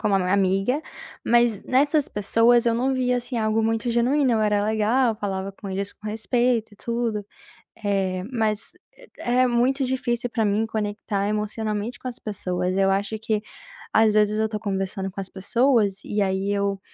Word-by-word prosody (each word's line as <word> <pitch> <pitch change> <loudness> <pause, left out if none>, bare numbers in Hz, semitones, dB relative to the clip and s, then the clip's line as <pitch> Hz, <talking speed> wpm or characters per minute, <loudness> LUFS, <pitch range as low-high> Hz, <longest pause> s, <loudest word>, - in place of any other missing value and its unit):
como 210 -2 +1
amiga, 195 +7 +2 0.4
mas 235 -3 +3
nessas 285 +3 +2
pessoas, 230 +3 +3
eu 230 - +3
não 260 +3 +1
vi 250 -1 +1
assim 245 0 -2
algo 220 0 +1
muito 225 +2 0
genuíno, 255 +3 +2
eu 220 - +2
era 210 -1 +2
legal, 220 +3 +2
falava 195 -2 -4
com 195 0 -9
eles 195 +1 -3
com 215 - -12
respeito 230 +1 0
e - - -16
tudo, 230 -2 -2 0.6
eh, 190 -2 0
mas 220 -3 -1 0.4
é 250 +1 +2
muito 250 +3 +2
difícil 245 -2 -1
para 230 -2 0
mim 210 +2 +1
conectar 205 -2 -2
emocionalmente 215 +1 -2
com - - -6
as 245 - -6
pessoas, 185 -3 -2
eu 195 0 +3
acho 200 +3 -1
que, 215 -1 -1 0.5
às 220 -1 +4
vezes, 210 0 +3
eu 220 - +2
estou 215 -1 -3
conversando 195 -1 -3
com 200 - -8
as 190 -1 -5
pessoas, 210 0 +1
e, 210 0 -1
aí 190 +1 0
eu 200 -1 -1
215 Hz, 170 wpm, -24 LUFS, 200-240 Hz, 0.6 s, às